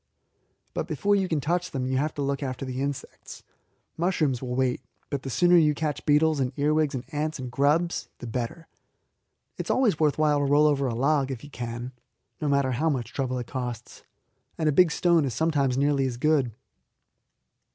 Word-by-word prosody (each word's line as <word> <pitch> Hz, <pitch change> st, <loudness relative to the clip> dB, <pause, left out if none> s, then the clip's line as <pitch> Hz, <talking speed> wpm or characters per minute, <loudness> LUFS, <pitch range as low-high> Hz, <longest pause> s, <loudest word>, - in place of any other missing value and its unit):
But -, -, -3 dB
before 205 Hz, 0 st, +1 dB
you 195 Hz, -2 st, +1 dB
can 160 Hz, -4 st, 0 dB
touch 175 Hz, +5 st, -1 dB
them 130 Hz, -2 st, -3 dB
you 130 Hz, 0 st, 0 dB
have 150 Hz, +3 st, 0 dB
to 145 Hz, -, -2 dB
look 140 Hz, 0 st, -1 dB
after 135 Hz, -1 st, -4 dB
the 130 Hz, 0 st, -4 dB
insects. 140 Hz, -1 st, -6 dB, 0.5 s
Mushrooms 160 Hz, -7 st, 0 dB
will 125 Hz, -1 st, -3 dB
wait, 130 Hz, -1 st, 0 dB, 0.3 s
but 140 Hz, -2 st, -2 dB
the 135 Hz, -, -6 dB
sooner 175 Hz, +6 st, +4 dB
you 150 Hz, -3 st, +4 dB
catch 150 Hz, -1 st, -3 dB
beetles, 150 Hz, 0 st, +4 dB
and 130 Hz, -2 st, 0 dB
earwigs, 150 Hz, 0 st, +1 dB
and 125 Hz, 0 st, -5 dB
ants, 155 Hz, +2 st, -2 dB
and 125 Hz, -2 st, -6 dB
grubs, 150 Hz, +6 st, +1 dB
the -, -, -9 dB
better. 120 Hz, +7 st, -4 dB, 0.9 s
It -, -, -4 dB
is -, -, -8 dB
always 225 Hz, -, +2 dB
worth 150 Hz, -2 st, +2 dB
while 150 Hz, -1 st, +3 dB
to 145 Hz, -, +1 dB
roll 145 Hz, +2 st, +4 dB
a 150 Hz, -, +4 dB
log 135 Hz, +2 st, +1 dB
over, -, -, -5 dB
if 125 Hz, -4 st, -6 dB
you 145 Hz, -, -11 dB
can, 120 Hz, 0 st, -5 dB, 0.5 s
no 150 Hz, -, 0 dB
matter 140 Hz, -2 st, +2 dB
how 155 Hz, +7 st, +1 dB
much 120 Hz, -5 st, -3 dB
trouble 130 Hz, -2 st, -2 dB
it 125 Hz, -, -4 dB
costs; 125 Hz, -2 st, -6 dB, 0.6 s
and 160 Hz, -, 0 dB
a -, -, +4 dB
big 175 Hz, +4 st, +5 dB
stone 170 Hz, 0 st, +3 dB
is 130 Hz, -5 st, -2 dB
sometimes 145 Hz, -5 st, +1 dB
nearly 140 Hz, -1 st, +2 dB
as 120 Hz, -2 st, -4 dB
good. 140 Hz, -3 st, +2 dB
140 Hz, 200 wpm, -26 LUFS, 130-155 Hz, 0.9 s, big